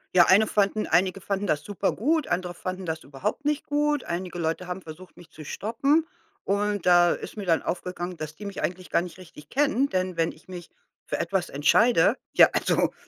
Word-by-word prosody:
Ja, 175 -2 +8
eine 210 +3 +5
fanden 205 +1 +1
einige 185 +3 +2
fanden 195 +1 -2
das 150 -3 0
super 200 -1 -1
gut, 310 +6 0
andere 180 0 -2
fanden 185 +1 -5
das 160 -1 -4
überhaupt 140 - -4
nicht 300 0 0
gut. 295 -1 0
Einige 175 0 -4
Leute 165 +2 -2
haben 180 +1 -5
versucht, 170 +2 -12
mich 175 - -15
zu 155 - -11
stoppen 275 - 0 0.4
und 205 -1 0
da 175 -1 +6
ist - - -5
mir 205 -2 -6
dann 165 -3 +2
aufgegangen, 180 0 -4
dass 155 -2 -7
die 210 - -10
mich 200 -1 -5
eigentlich 185 0 -3
gar - - +2
nicht 175 -1 -8
richtig 165 -5 -14
kennen, 280 -1 +1
denn 185 -3 -1
wenn 165 0 +1
ich 155 - -20
mich 180 -2 -9 0.4
für - - -3
etwas 180 +1 -1
entscheide, 165 - +4 0.2
ja, - - +8
also, - - +1
185 Hz, 200 wpm, -26 LUFS, 170-210 Hz, 0.4 s, Ja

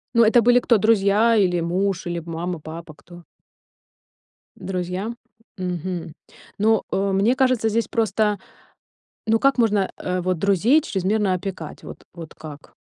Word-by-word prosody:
Ну 235 - +6
это 225 +2 +5
были 245 +2 +5
кто: 235 -2 +3
друзья 215 +1 +3
или 180 -4 +2
муж, 185 +3 -1
или 175 -1 -3
мама, 170 +1 -4
папа, 160 +1 -9
кто? 175 +4 -15 1.3
Друзья? 185 +3 -4 0.5
Мгм. 180 -2 -4 0.5
Ну, 220 +1 +3
э, 195 0 0
мне 205 +7 +2
кажется, 255 -4 +2
здесь 230 +1 0
просто 215 -2 0 0.9
ну 225 +1 +3
как 275 +2 +2
можно, 210 -5 +2
э, 180 0 -3
вот 185 -1 -1
друзей 200 - +3
чрезмерно 200 - 0
опекать? 185 -4 -6
Вот - - -11
вот 165 -2 -10
как? 150 -2 -12
195 Hz, 140 wpm, -22 LUFS, 175-220 Hz, 1.3 s, Ну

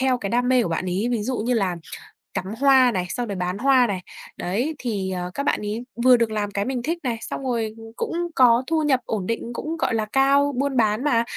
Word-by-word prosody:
theo 260 -1 +2
cái 200 - -4
đam 245 +1 +1
mê 255 -2 +4
của - - -2
bạn 165 +2 -2
ấy, 185 +6 -1
ví 230 -3 0
dụ 250 +3 -2
như 240 +3 0
là 190 -5 0 0.6
cắm 185 - -3
hoa 265 -3 +6
này, 185 -5 -1
xong 245 +3 -3
rồi 200 - -4
bán 180 +1 -2
hoa 260 0 +4
này. 195 -3 -2 0.4
Đấy 240 - -2
thì, 200 -6 -2
ờ, 180 -1 -4
các 280 - -3
bạn - - +1
ấy 210 +3 -3 0.2
vừa 255 -1 +7
được 230 -2 0
làm 205 -1 -2
cái 200 0 -1
mình 255 -2 -2
thích 330 +5 -1
này, 235 -3 -1
xong - - -5
rồi 230 -4 -2 0.2
cũng - - -3 0.2
có 245 -1 +5
thu 320 -1 +1
nhập 275 -4 +3
ổn 205 -5 -2
định, 230 +1 -3
cũng, 315 +6 -4
gọi 320 - 0
là, 220 - 0
cao, 275 +4 +3
buôn 275 -1 0
bán 220 +2 +2
mà, 235 -6 +3
235 Hz, 250 wpm, -23 LUFS, 205-265 Hz, 0.6 s, vừa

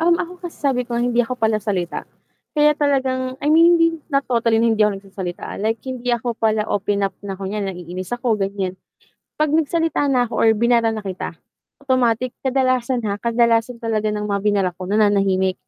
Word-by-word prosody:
Hmm, 340 +1 +4
ako 355 +1 -5
kasi - - -17
sabi 270 -4 0
ko, 235 - -2
hindi 240 0 +2
ako 245 +1 -2
palasalita 215 -6 -1 0.5
kaya 300 0 +5
talagang 260 -3 0
I 285 - -5
mean, 335 +2 +6
hindi 330 - +5 0.2
not 275 0 +1
totally 230 -2 +2
na 230 0 +3
hindi 215 - +2
ako 210 -2 +2
nagsasalita, 190 -2 -7
ah, - - -8
like, 220 +1 0
hindi 250 -1 -3
ako 240 0 -1
pala 220 -1 +1
open 200 -1 0
up 195 - -8
na 195 -1 -6
kunyari, 200 +2 -3
naiinis 180 +1 -7
ako, 240 -2 +1
ganiyan. 195 -2 -2 0.6
'Pag 305 -1 +1
nagsalita 325 -1 +1
na 250 -2 +3
ako 240 - -2
or 225 - +5
binara 235 0 +3
na 215 -2 -5
kita, 185 -3 -5 0.5
automatic, 250 -1 +1
kadalasan, 255 -2 0
ha, 205 0 -3
kadalasan 235 0 +2
talaga 220 -2 -1
ng 210 0 -2
mga 200 -1 -1
binara 200 -3 +1
ko, 185 +1 -8
nananahimik. 195 -3 +2
230 Hz, 190 wpm, -20 LUFS, 205-255 Hz, 0.6 s, mean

